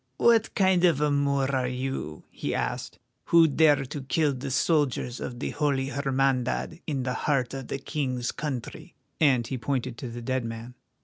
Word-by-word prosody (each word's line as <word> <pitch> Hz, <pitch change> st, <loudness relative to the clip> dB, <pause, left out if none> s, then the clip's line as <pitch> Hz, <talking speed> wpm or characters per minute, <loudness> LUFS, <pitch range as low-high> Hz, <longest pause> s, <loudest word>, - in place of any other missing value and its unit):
"What 230 Hz, -2 st, +3 dB
kind 190 Hz, -2 st, +3 dB
of 170 Hz, -6 st, +4 dB
a 150 Hz, 0 st, +2 dB
Moor 140 Hz, -1 st, +1 dB
are 130 Hz, -1 st, +1 dB
you," 125 Hz, -, -4 dB
he -, -, -3 dB
asked, -, -, -3 dB, 0.3 s
"who 165 Hz, -1 st, +6 dB
dare 145 Hz, -2 st, +4 dB
to 140 Hz, +2 st, -6 dB
kill 145 Hz, +2 st, +1 dB
the 135 Hz, +2 st, -5 dB
soldiers 135 Hz, -3 st, +1 dB
of 120 Hz, -, -5 dB
the -, -, -3 dB
Holy 140 Hz, -3 st, 0 dB
Hermandad 135 Hz, +2 st, 0 dB
in 140 Hz, -4 st, -1 dB
the 125 Hz, 0 st, -1 dB
heart 130 Hz, -3 st, 0 dB
of 135 Hz, -2 st, -6 dB
the -, -, -3 dB
King's 130 Hz, -3 st, -2 dB
country?" 135 Hz, -6 st, -6 dB, 0.2 s
and 130 Hz, -6 st, +4 dB
he 130 Hz, +1 st, -4 dB
pointed 120 Hz, -1 st, -2 dB
to 125 Hz, -, -5 dB
the 120 Hz, 0 st, -7 dB
dead 130 Hz, +1 st, -1 dB
man. 115 Hz, +1 st, -6 dB
135 Hz, 180 wpm, -27 LUFS, 125-145 Hz, 0.3 s, who